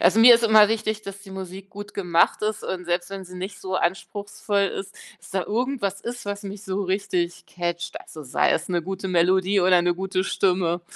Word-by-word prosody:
also, 225 Hz, -, +5 dB
mir 240 Hz, +1 st, +10 dB
ist 235 Hz, 0 st, +2 dB
immer 215 Hz, -2 st, +7 dB
wichtig, 215 Hz, -1 st, -1 dB
dass 200 Hz, -1 st, -8 dB
die 195 Hz, -, -13 dB
Musik 190 Hz, +1 st, -8 dB
gut 205 Hz, 0 st, -9 dB
gemacht 175 Hz, -1 st, +2 dB
ist 215 Hz, 0 st, -1 dB
und 180 Hz, -1 st, -4 dB
selbst 175 Hz, 0 st, -1 dB
wenn 195 Hz, -1 st, -7 dB
sie 180 Hz, 0 st, -11 dB
nicht 195 Hz, +2 st, -6 dB
so 190 Hz, -1 st, -5 dB
anspruchsvoll 200 Hz, +3 st, -1 dB
ist, 195 Hz, 0 st, -7 dB, 0.2 s
dass -, -, -15 dB
da 190 Hz, -2 st, -1 dB
irgendwas 225 Hz, -4 st, -1 dB
ist, 240 Hz, -1 st, -6 dB
was 205 Hz, +1 st, -4 dB
mich 200 Hz, 0 st, -7 dB
so 195 Hz, -1 st, -2 dB
richtig 185 Hz, -2 st, -2 dB
catcht. 175 Hz, -1 st, -4 dB
Also, 155 Hz, -, -11 dB
sei 130 Hz, -, +1 dB
es 160 Hz, -, 0 dB
'ne 175 Hz, -2 st, 0 dB
gute 190 Hz, +2 st, -4 dB
Melodie 185 Hz, +3 st, +3 dB
oder 180 Hz, -1 st, +5 dB
'ne 175 Hz, 0 st, +1 dB
gute 185 Hz, +1 st, -1 dB
Stimme. 180 Hz, -3 st, +1 dB
190 Hz, 210 wpm, -24 LUFS, 180-205 Hz, 0.2 s, mir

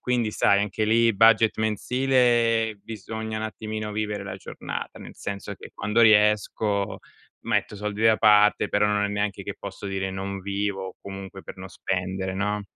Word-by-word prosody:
quindi 120 Hz, -3 st, 0 dB
sai 100 Hz, -, +3 dB
anche 105 Hz, +1 st, -1 dB
lì 115 Hz, 0 st, +3 dB
budget 110 Hz, +1 st, +5 dB
mensile 115 Hz, 0 st, +2 dB
bisogna 110 Hz, 0 st, -5 dB
un 110 Hz, -, -3 dB
attimino 110 Hz, -1 st, -5 dB
vivere 105 Hz, -1 st, -3 dB
la 95 Hz, -1 st, -6 dB
giornata, -, -, -7 dB
nel -, -, -11 dB
senso 100 Hz, -1 st, -5 dB
che -, -, -12 dB
quando 105 Hz, +3 st, 0 dB
riesco 105 Hz, -1 st, +3 dB, 0.5 s
metto 105 Hz, -, 0 dB
soldi 105 Hz, +1 st, -4 dB
da 110 Hz, -1 st, +5 dB
parte, 105 Hz, -1 st, +5 dB
però 105 Hz, +1 st, +3 dB
non 105 Hz, 0 st, +1 dB
è -, -, 0 dB
neanche 100 Hz, -1 st, -2 dB
che -, -, -5 dB
posso -, -, -7 dB
dire 95 Hz, -1 st, -2 dB
non 95 Hz, +1 st, -5 dB
vivo 100 Hz, -1 st, -3 dB
comunque 95 Hz, -1 st, -9 dB
per -, -, -10 dB
non 95 Hz, 0 st, -8 dB
spendere, 95 Hz, 0 st, -3 dB
no? 105 Hz, +1 st, -1 dB
105 Hz, 165 wpm, -25 LUFS, 100-110 Hz, 0.5 s, budget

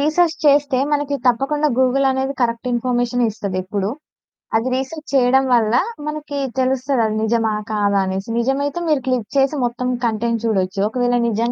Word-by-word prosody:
Research 320 Hz, +3 st, +2 dB
చేస్తే 285 Hz, -2 st, +4 dB
మనకు 290 Hz, -1 st, 0 dB
తప్పకుండా 290 Hz, +5 st, +2 dB
గూగుల్ 265 Hz, +1 st, +3 dB
అనేది 265 Hz, +1 st, -1 dB
కరెక్ట్ 235 Hz, +1 st, 0 dB
ఇన్ఫర్మేషనే 245 Hz, 0 st, 0 dB
ఇస్తది 200 Hz, -3 st, -4 dB
ఎప్పుడు. 195 Hz, +1 st, -2 dB, 0.7 s
అది 225 Hz, +3 st, +1 dB
రిసర్చ్ 285 Hz, +4 st, -5 dB
చేయడం 265 Hz, 0 st, +4 dB
వల్ల 225 Hz, -1 st, +3 dB, 0.3 s
మనకి 300 Hz, -1 st, -5 dB, 0.2 s
తెలుస్తది 260 Hz, 0 st, +1 dB
అది 215 Hz, 0 st, -1 dB
నిజమా 225 Hz, 0 st, +1 dB, 0.2 s
కాదా 205 Hz, -1 st, +1 dB
అనేసి 190 Hz, +3 st, -4 dB
నిజమైతే 275 Hz, +6 st, -1 dB
మీరు 300 Hz, -4 st, +2 dB
క్లిక్ 250 Hz, -5 st, 0 dB
చేసి 275 Hz, +2 st, +3 dB
మొత్తం 250 Hz, +1 st, -2 dB, 0.2 s
కంటెంట్ 230 Hz, 0 st, -1 dB
చూడొచ్చు 195 Hz, -3 st, 0 dB
ఒకవేళ 245 Hz, +1 st, +1 dB
నిజం 230 Hz, +2 st, 0 dB
250 Hz, 150 wpm, -19 LUFS, 225-275 Hz, 0.7 s, చేస్తే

